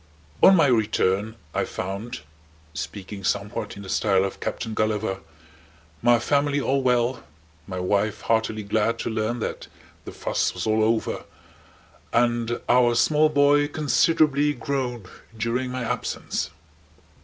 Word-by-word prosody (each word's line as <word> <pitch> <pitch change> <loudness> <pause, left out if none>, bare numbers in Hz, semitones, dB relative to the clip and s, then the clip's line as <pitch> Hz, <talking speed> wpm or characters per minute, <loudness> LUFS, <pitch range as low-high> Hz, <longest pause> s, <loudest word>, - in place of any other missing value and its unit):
On 190 - +8
my 165 - +5
return 110 -3 +1 0.2
I - - 0
found 100 +5 -5 0.5
(speaking 95 +6 -6
somewhat 100 +2 -2
in 100 - -8
the - - -9
style 95 -2 +2
of 95 - -5
Captain 110 - -4
Gulliver) 110 -2 -1 0.8
my 120 0 +5
family 145 +3 +1
all 135 0 +1
well, 125 -2 +1 0.4
my 90 -1 -4
wife 100 +3 0
heartily 110 -1 0
glad 110 +3 0
to - - -3
learn 110 +2 -1
that - - -4 0.4
the - - -7
fuss - - -1
was 90 - -3
all 110 0 +2
over, 110 0 0 0.9
and 120 0 +1
our 120 -1 +4
small 155 +5 +4
boy 145 0 +4
considerably 150 0 +2
grown 125 -3 -3 0.3
during 120 +4 -1
my 125 0 -3
absence. 115 -9 -3
115 Hz, 130 wpm, -24 LUFS, 105-130 Hz, 0.9 s, On